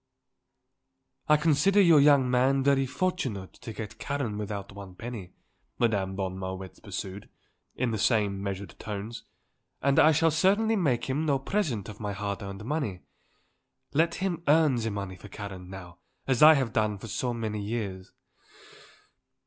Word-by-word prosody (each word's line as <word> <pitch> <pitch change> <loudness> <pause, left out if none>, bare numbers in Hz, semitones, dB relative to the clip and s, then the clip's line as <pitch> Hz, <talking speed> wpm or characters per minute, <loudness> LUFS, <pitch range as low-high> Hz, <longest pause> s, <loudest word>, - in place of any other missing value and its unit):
"I 150 - +7
consider 160 +6 +3
your 170 -6 +7
young 140 -2 +5
man 130 +2 +2
very 135 -1 +3
fortunate 130 - -2
to - - -9
get 110 0 -7
Karen 140 -7 -2
without 100 -1 -5
one 100 -2 -10
penny," 110 -5 -7 0.4
Madame 100 -5 0
von 95 -1 -3
Marwitz 95 0 -6
pursued, 100 -1 -7 0.5
in 125 -2 0
the 110 - -2
same 100 -3 +1
measured 100 0 -5
tones, 110 +2 -6 0.6
"and 140 0 +3
I 155 - +7
shall 160 +1 +3
certainly 200 +8 +3
make 140 - +1
him 140 +4 -1
no 140 -2 +3
present 135 - -2
of 105 -1 -9
my 105 -2 -3
hard 100 +1 -4
earned 100 +1 -7
money. 130 - -2 0.9
Let 165 +3 +2
him 185 -3 -2
earn 155 -1 +5
the 115 -1 -1
money 100 -3 -5
for 105 - -12
Karen, 95 -3 -8
now, 90 -2 -10 0.3
as 130 -3 +1
I 155 +1 +10
have 130 -5 -1
done 110 -2 +1
for 100 - -10
so 125 +4 -2
many 110 -3 -3
years. 100 -4 -4
115 Hz, 155 wpm, -28 LUFS, 100-140 Hz, 0.9 s, I